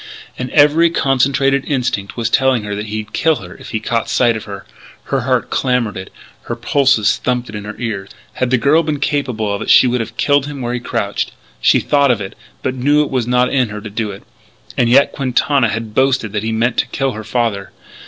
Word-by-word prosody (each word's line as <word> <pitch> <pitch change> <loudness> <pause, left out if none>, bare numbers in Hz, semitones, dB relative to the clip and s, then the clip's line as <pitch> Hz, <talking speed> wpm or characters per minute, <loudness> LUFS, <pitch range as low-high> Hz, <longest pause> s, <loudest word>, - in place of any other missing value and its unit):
And 125 0 -5
every 150 +4 +5
concentrated 135 -2 +1
instinct 120 -8 -2
was 115 -1 0
telling 130 -1 +2
her 105 0 -4
that 105 +1 -4
he'd 110 0 -5
kill 160 -1 +2
her 90 -8 -9
if - - -12
he 110 - -2
caught 115 +1 -2
sight 120 -2 +2
of 110 - -6
her; 100 -1 -8 0.4
her 135 - -1
heart 125 -2 0
clamoured 125 -5 0
it; 95 0 -8 0.3
her - - -3
pulses 135 -7 +2
thumped 125 -1 -2
it - - -10
in 105 0 -6
her 105 - -7
ears. 105 -5 -4 0.2
Had 130 - -1
the 130 - +3
girl 145 +7 +3
been 150 -3 -2
capable 125 -8 -1
of 100 - -4
it - - -4
she 130 - +7
could 125 0 0
have 115 0 -6
killed 145 -1 +2
him 145 -1 -7
where 120 0 -2
he 125 - -2
crouched. 115 -4 -3 0.3
She - - +4
thought 140 -1 +2
of 120 -4 +2
it, 95 -2 -6 0.3
but 130 - -1
knew 145 +4 +2
it 145 - -6
was 125 -3 -1
not 125 0 +2
in 130 -4 +2
her 105 0 -6
to 105 -1 -9
do 110 0 -2
it. 100 0 -9 0.5
And 120 -2 +2
yet 135 +3 +5
Quintana 135 -1 +1
had 110 -1 -4
boasted 130 -4 +1
that 105 -1 -2
he 110 +1 -2
meant 115 +2 0
to - - +1
kill 135 -1 -1
her 110 -2 -7
father. 105 -5 -2
125 Hz, 230 wpm, -17 LUFS, 110-135 Hz, 0.5 s, she